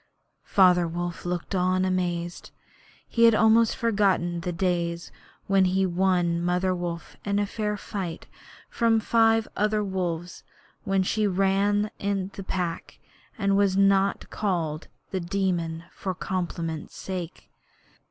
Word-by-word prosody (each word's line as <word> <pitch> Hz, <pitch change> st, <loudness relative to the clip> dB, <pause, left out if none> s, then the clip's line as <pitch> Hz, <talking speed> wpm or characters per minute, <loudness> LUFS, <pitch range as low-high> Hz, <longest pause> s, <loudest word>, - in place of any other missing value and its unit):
Father 180 Hz, -3 st, +5 dB
Wolf 175 Hz, +1 st, -4 dB
looked 175 Hz, +2 st, -3 dB
on 185 Hz, 0 st, +2 dB
amazed. 175 Hz, -2 st, -2 dB, 0.6 s
He 230 Hz, 0 st, +3 dB
had 230 Hz, -1 st, +6 dB
almost 220 Hz, +1 st, +4 dB
forgotten 195 Hz, -6 st, +1 dB
the 180 Hz, -, -3 dB
days 170 Hz, -1 st, -1 dB, 0.3 s
when 195 Hz, -1 st, +3 dB
he 185 Hz, +1 st, +1 dB
had 185 Hz, -2 st, 0 dB
won 175 Hz, -2 st, +2 dB
Mother 180 Hz, +1 st, +1 dB
Wolf 175 Hz, -2 st, -5 dB
in 205 Hz, 0 st, 0 dB
fair 210 Hz, 0 st, -3 dB
fight 190 Hz, -5 st, -5 dB, 0.4 s
from 230 Hz, -1 st, +2 dB
five 225 Hz, 0 st, +3 dB
other 210 Hz, 0 st, +1 dB
wolves, 180 Hz, -3 st, -3 dB, 0.4 s
when 195 Hz, -1 st, +2 dB
she 210 Hz, +3 st, +1 dB
ran 200 Hz, +2 st, +1 dB
in 195 Hz, -1 st, -2 dB
the 195 Hz, -, -7 dB
Pack 180 Hz, -3 st, -4 dB, 0.4 s
and 200 Hz, -1 st, +1 dB
was 195 Hz, -1 st, +2 dB
not 195 Hz, 0 st, +3 dB
called 170 Hz, -6 st, -2 dB, 0.2 s
The 190 Hz, -, -1 dB
Demon 170 Hz, -3 st, -1 dB
for 190 Hz, -2 st, -4 dB
compliment's 170 Hz, -4 st, -4 dB
sake. 180 Hz, -3 st, -6 dB
185 Hz, 130 wpm, -26 LUFS, 175-200 Hz, 0.6 s, had